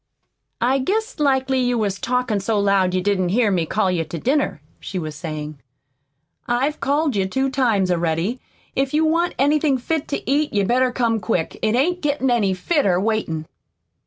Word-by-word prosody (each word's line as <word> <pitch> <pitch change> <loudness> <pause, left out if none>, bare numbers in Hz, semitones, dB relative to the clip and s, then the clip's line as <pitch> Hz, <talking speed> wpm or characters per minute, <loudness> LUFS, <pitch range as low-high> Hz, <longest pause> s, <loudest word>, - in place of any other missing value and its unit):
"I 260 +3 +2
guess 435 - -2
likely 265 -2 +2
you 245 -1 +1
was 200 -3 -1
talkin' 250 -4 0
so 210 +2 0
loud 195 -2 +2
you 185 - +1
didn't 190 -3 +1
hear 215 +2 +2
me 170 -4 0
call 195 0 +1
you 170 -2 0
to 160 +2 -6
dinner," 265 - 0 0.2
she 190 - -6
was 155 -3 -4
saying. 155 -1 -6 0.9
"I've 265 +5 0
called 285 -1 +1
you 190 -1 +1
two 265 +6 -1
times 225 -9 +1
already. 170 +7 0 0.4
If 270 +1 0
you 315 +1 +3
want 335 +2 +1
anything 290 0 +2
fit 315 +5 -2
to - - -4
eat 290 +3 +1
you'd 200 -2 +2
better 255 +2 +2
come 235 -3 0
quick. 180 -7 -2
It 215 +1 +1
ain't 350 +8 +1
gettin' 285 -3 0
any 205 -6 +2
fitter, 190 - +1
waitin'." 195 -7 -1
240 Hz, 180 wpm, -21 LUFS, 190-275 Hz, 0.9 s, you